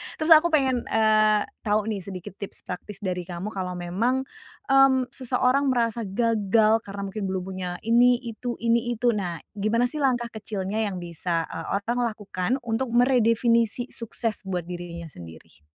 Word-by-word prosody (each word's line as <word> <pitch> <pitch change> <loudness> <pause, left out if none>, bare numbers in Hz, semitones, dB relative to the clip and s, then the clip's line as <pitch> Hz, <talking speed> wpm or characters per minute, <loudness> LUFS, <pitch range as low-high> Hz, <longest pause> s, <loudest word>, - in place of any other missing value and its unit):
Terus 315 +1 -1
aku 320 +1 +8
pengen, 265 -7 +1
eee, 215 -1 +3 0.2
tahu 210 -1 +1
nih 205 - -2
sedikit 185 -2 -7
tips 200 - -8
praktis 195 +3 -7
dari 180 -2 -3
kamu 180 +3 -5
kalau 185 -2 -4
memang, 210 +10 0 0.5
mmm, 265 -2 +5
seseorang 255 +2 +1
merasa 235 -3 0
gagal 220 +1 +3
karena 200 0 -6
mungkin 200 0 -4
belum 190 -1 -2
punya 185 -1 -5
ini-itu, 240 0 +2
ini-itu, 235 +1 +2
nah, 180 -6 -3 0.2
gimana 220 +4 +2
sih 305 - -4
langkah 245 -4 +1
kecilnya 210 -2 -4
yang 185 -3 -5
bisa, 170 0 -2
eee 165 -1 -6 0.2
orang 240 +3 -1 0.2
lakukan 195 -1 -4
untuk 235 +1 -2
meredefinisi 235 -1 +3
sukses 230 -1 -4
buat 180 -2 -2
dirinya 170 -1 -7
sendiri? 80 - -13
220 Hz, 150 wpm, -25 LUFS, 185-240 Hz, 0.5 s, aku